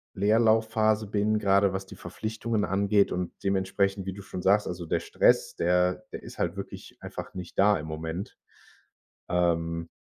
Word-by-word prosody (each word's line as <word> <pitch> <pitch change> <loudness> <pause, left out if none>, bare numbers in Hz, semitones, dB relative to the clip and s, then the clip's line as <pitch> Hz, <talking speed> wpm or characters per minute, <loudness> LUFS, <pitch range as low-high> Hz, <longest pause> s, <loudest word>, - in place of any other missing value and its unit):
Leerlaufphase 110 +1 +3
bin, 105 +1 +1
grade 100 -1 +3
was 95 0 -3
die - - -11
Verpflichtungen 110 0 -3
angeht 100 +1 +2
und 90 -1 -2
dementsprechend, 95 0 0
wie 95 - -3
du 100 - -9
schon 90 - -6
sagst, 100 +3 +3
also, 90 -1 -5
der - - +1
Stress, - - +2
der 90 +1 +1
der - - -7
ist - - -11
halt 85 +2 0
wirklich 100 - -8
einfach - - -7
nicht 90 -1 -8
da 105 +1 +5
im 75 - -6
Moment. 80 +4 -5 0.9
Ähm, 85 -1 0
95 Hz, 160 wpm, -27 LUFS, 90-105 Hz, 0.9 s, da